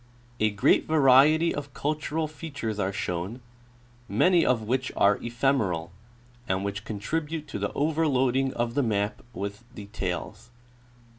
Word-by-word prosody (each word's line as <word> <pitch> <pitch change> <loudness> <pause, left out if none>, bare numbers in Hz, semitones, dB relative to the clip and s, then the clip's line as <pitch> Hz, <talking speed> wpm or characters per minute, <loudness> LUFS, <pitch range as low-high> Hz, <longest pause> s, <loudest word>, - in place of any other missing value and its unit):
A 110 - +3
great 100 -1 +2
variety 155 +2 +5
of 145 -2 -6
cultural 155 +1 -2
features 145 -9 -5
are 95 -1 0
shown, 95 +4 -3 0.7
many 180 -2 +4
of 120 -3 +2
which 130 +4 -1
are 100 0 +4
ephemeral, 115 -9 0 0.6
and 95 +1 -1
which 100 +1 -4
contribute 150 +9 -3
to - - -4
the - - -2
overloading 135 -4 +1
of 120 0 -1
the 145 - +2
map 105 -3 -1
with 100 +3 -5
details. 105 +2 -5
125 Hz, 130 wpm, -27 LUFS, 105-145 Hz, 0.7 s, variety